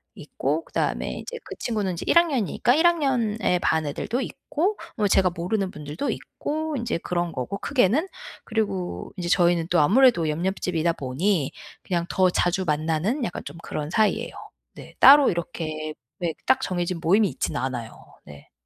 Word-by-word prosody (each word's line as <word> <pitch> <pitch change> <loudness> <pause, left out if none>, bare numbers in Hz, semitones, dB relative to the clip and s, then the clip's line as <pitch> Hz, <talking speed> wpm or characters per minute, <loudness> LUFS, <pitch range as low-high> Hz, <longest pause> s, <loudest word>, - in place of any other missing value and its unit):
있고 330 - -3
그다음에 - - -2
이제 480 - -7
그 - - -8
친구는 210 -6 -1
이제 170 - -6
1 - - +4
학년이니까 260 - +2
1 325 +3 +5
학년의 240 - +1
반 160 -2 +1
애들도 230 - -2
있고 365 +9 -2 0.2
뭐 210 - +1
제가 190 -1 +4
모르는 185 +3 -2
분들도 150 - -5
있고 315 0 -4
인제 235 -7 -2
그런 175 0 -2
거고 130 +10 -4
크게는 265 - +2 0.4
그리고 200 -5 -3
인제 175 -1 -3
저희는 175 -2 +3
또 175 - +3
아무래도 205 - +4
옆 155 +3 -2
옆집이다 175 -3 0
보니 145 +3 -1 0.3
그냥 170 -2 -1
더 185 -1 +3
자주 175 +1 +1
만나는 160 - 0
약간 175 - -5
좀 145 +4 -8
그런 150 -2 -5
사이예요. 215 +5 +1 0.4
네 - - -13
따로 280 0 +9
이렇게 155 -2 -4 0.3
왜 170 -2 -1
그 - - -36
딱 260 - +3
정해진 175 -1 -2
모임이 200 +6 +4
있진 150 - -3
않아요. 125 -4 -3 0.3
네. 70 -1 -14
180 Hz, 340 characters per minute, -24 LUFS, 165-235 Hz, 0.4 s, 따로